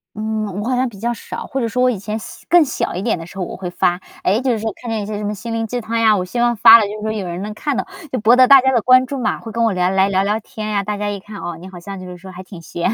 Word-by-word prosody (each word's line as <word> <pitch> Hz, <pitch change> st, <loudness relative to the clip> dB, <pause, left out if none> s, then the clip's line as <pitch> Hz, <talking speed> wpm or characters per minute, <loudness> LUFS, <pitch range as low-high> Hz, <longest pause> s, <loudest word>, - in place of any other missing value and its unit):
嗯， 215 Hz, -2 st, -3 dB
我 225 Hz, -, -3 dB
好 255 Hz, -, +1 dB
像 255 Hz, +1 st, +1 dB
比 210 Hz, -5 st, -10 dB
较 235 Hz, +3 st, -1 dB
少， 235 Hz, -, -7 dB
或 270 Hz, -, -3 dB
者 235 Hz, -, 0 dB
说 250 Hz, +2 st, -1 dB
我 255 Hz, -, +4 dB
以 240 Hz, -, -1 dB
前 210 Hz, +3 st, -4 dB
小 -, -, -11 dB
更 350 Hz, -1 st, +6 dB
小 275 Hz, -, -2 dB
一 180 Hz, -, -3 dB
点 225 Hz, +3 st, 0 dB
的 165 Hz, -, -8 dB
时 180 Hz, -, -14 dB
候 -, -, -1 dB
我 -, -, -7 dB
会 180 Hz, -1 st, -5 dB
发。 175 Hz, 0 st, +1 dB, 0.2 s
诶， 200 Hz, +4 st, +2 dB
就 260 Hz, -1 st, +1 dB
是 225 Hz, -, -1 dB
说 220 Hz, +1 st, -2 dB
看 240 Hz, -, -6 dB
见 220 Hz, -1 st, -1 dB
一 200 Hz, -, -5 dB
些 210 Hz, -1 st, -4 dB
什 210 Hz, -, -5 dB
么 205 Hz, 0 st, -2 dB
心 230 Hz, +3 st, -7 dB
灵 225 Hz, 0 st, -1 dB
鸡 245 Hz, +2 st, -3 dB
汤 230 Hz, +1 st, -2 dB
呀， 220 Hz, -2 st, +5 dB
我 185 Hz, -, -1 dB
希 185 Hz, +7 st, -4 dB
望 240 Hz, 0 st, +2 dB
发 225 Hz, +1 st, +9 dB
了 225 Hz, -, +2 dB
就 -, -, -5 dB
是 -, -, -9 dB
说 215 Hz, 0 st, -2 dB
有 210 Hz, -3 st, -3 dB
人 175 Hz, +1 st, -5 dB
能 210 Hz, +2 st, -5 dB
看 285 Hz, +5 st, -2 dB
到， -, -, -2 dB, 0.2 s
就 255 Hz, -, -1 dB
博 225 Hz, +3 st, +5 dB
得 255 Hz, 0 st, +6 dB
大 275 Hz, 0 st, +8 dB
家 265 Hz, +1 st, +2 dB
的 240 Hz, -4 st, +1 dB
关 255 Hz, +1 st, +5 dB
注 275 Hz, -, -4 dB
嘛， 250 Hz, -, -1 dB
会 225 Hz, -, -9 dB
跟 230 Hz, +1 st, 0 dB
我 225 Hz, -3 st, +2 dB
聊 180 Hz, 0 st, +1 dB
来 190 Hz, +1 st, +2 dB
聊 190 Hz, -1 st, +2 dB
聊 210 Hz, +2 st, 0 dB
天 215 Hz, 0 st, -7 dB
呀。 205 Hz, -2 st, 0 dB
大 210 Hz, +1 st, -3 dB
家 205 Hz, 0 st, -2 dB
一 205 Hz, -1 st, -4 dB
看， 205 Hz, +2 st, -11 dB
哦， 170 Hz, -2 st, -5 dB
你 180 Hz, -, -10 dB
好 185 Hz, -2 st, -10 dB
像 195 Hz, +2 st, -8 dB
就 185 Hz, -, -9 dB
是 180 Hz, 0 st, -9 dB
说 190 Hz, +1 st, -11 dB
还 185 Hz, 0 st, -10 dB
挺 185 Hz, -2 st, -11 dB
闲 170 Hz, +2 st, -2 dB
哈， -, -, -1 dB
215 Hz, 395 characters per minute, -19 LUFS, 190-235 Hz, 0.2 s, 发